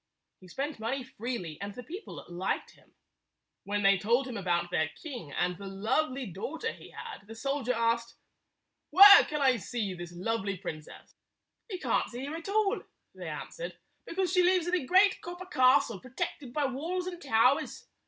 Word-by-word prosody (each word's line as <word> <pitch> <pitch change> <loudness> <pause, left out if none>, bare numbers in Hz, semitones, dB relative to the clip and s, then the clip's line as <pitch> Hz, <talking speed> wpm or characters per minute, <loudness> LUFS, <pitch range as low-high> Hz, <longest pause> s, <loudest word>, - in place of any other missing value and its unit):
He 185 - -15
spent 275 - -4
money 250 +4 -2
freely, 225 - -5
and 200 0 -5
the 250 - -8
people 370 - -8
liked 175 +2 -3
him. - - -25 0.7
When 205 +1 -1
they 195 -1 +5
told 240 +7 +2
him 250 - -6
about 175 -3 -1
their 160 -3 +1
king 245 - -7
and 180 +4 0
the 200 - -7
lovely 255 +8 -1
daugh 200 - -6
ter 455 - -1
he - - -13
had, 440 - -9
the 225 - -9
soldier 275 0 -1
asked, 230 0 0 0.7
"Where 400 +5 +10
can 300 -1 -3
I 260 -2 +4
see 215 -2 -3
this 175 -1 -8
lovely 195 +2 -2
princess?" 155 -5 -8 0.6
"You 380 - -3
can't - - 0
see 245 +3 -6
her 290 - -5
at 330 +4 -7
all," 415 -1 +1 0.3
they - - -7
answered, - - -6 0.3
"because 370 0 -1
she 365 - +5
lives 360 -1 +3
in 350 - -2
a 345 -8 0
great 380 +4 +5
copper 355 +1 -7
castle, 255 - +3
pro 255 - -13
tected 260 +1 -4
by 295 +2 0
walls 325 +8 -2
and 355 -1 -6
towers. 255 -1 +2
255 Hz, 185 wpm, -30 LUFS, 200-330 Hz, 0.7 s, Where